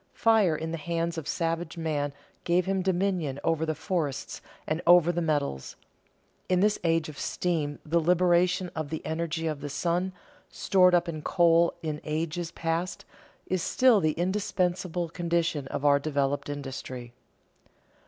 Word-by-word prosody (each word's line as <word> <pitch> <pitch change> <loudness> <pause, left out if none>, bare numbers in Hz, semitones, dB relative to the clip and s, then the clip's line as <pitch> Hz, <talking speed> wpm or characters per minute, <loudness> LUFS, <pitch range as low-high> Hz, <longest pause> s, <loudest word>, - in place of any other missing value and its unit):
Fire 220 -8 +4
in 160 +1 -4
the 165 - -4
hands 170 +1 -2
of 150 - -9
savage 165 +1 -2
man 150 -3 -1 0.3
gave 175 +1 +2
him 190 0 0
dominion 180 -6 0
over 160 -1 0
the 155 - -1
forests 155 -3 -3 0.2
and 155 +2 -2
over 175 -1 +7
the 175 0 -2
metals. 145 - -1 0.7
In 185 -1 +3
this 210 +2 +2
age 165 -2 +1
of 150 -2 -9
steam 155 -5 -1
the 165 +2 +2
liberation 180 +1 +2
of 155 -3 -3
the 160 0 -5
energy 165 0 -2
of 155 -3 -2
the 145 - -5
sun, 175 +5 -1 0.4
stored 180 -2 +4
up 175 0 +2
in 155 -2 -4
coal 170 0 +3
in 155 -2 -3
ages 160 +2 -2
past, 165 +2 -3 0.4
is 185 -1 -1
still 250 +1 +4
the 155 -4 +1
indispensable 180 -1 -1
condition 170 -4 -1
of 140 - -4
our 140 -1 +5
developed 140 -1 -1
industry. 130 -4 -6
165 Hz, 155 wpm, -28 LUFS, 155-180 Hz, 0.7 s, over